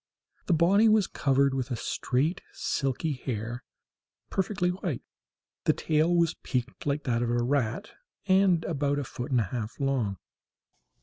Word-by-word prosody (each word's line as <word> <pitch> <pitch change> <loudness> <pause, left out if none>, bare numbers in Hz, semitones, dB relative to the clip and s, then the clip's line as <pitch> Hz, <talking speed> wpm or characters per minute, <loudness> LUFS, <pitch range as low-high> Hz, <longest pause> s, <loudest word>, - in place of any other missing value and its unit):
The 180 - +3
body 195 +7 +5
was 215 -2 +4
covered 140 -2 +2
with 130 -2 -2
a 125 - -1
straight 140 - -1
silky 140 +3 -1
hair, 120 -2 -4 0.7
perfectly 185 -2 0
white. 180 -7 -4 0.6
The - - +5
tail 155 +2 +1
was 170 -2 +3
peaked 130 +2 -3
like 145 +1 0
that 120 -3 0
of 120 - 0
a 120 0 +1
rat, 135 - 0 0.3
and 190 -3 +4
about 145 -2 0
a 145 - -1
foot 125 +1 -6
and 125 -3 +3
a 95 - -4
half 115 0 -4
long. 130 -8 0
140 Hz, 150 wpm, -28 LUFS, 125-170 Hz, 0.7 s, body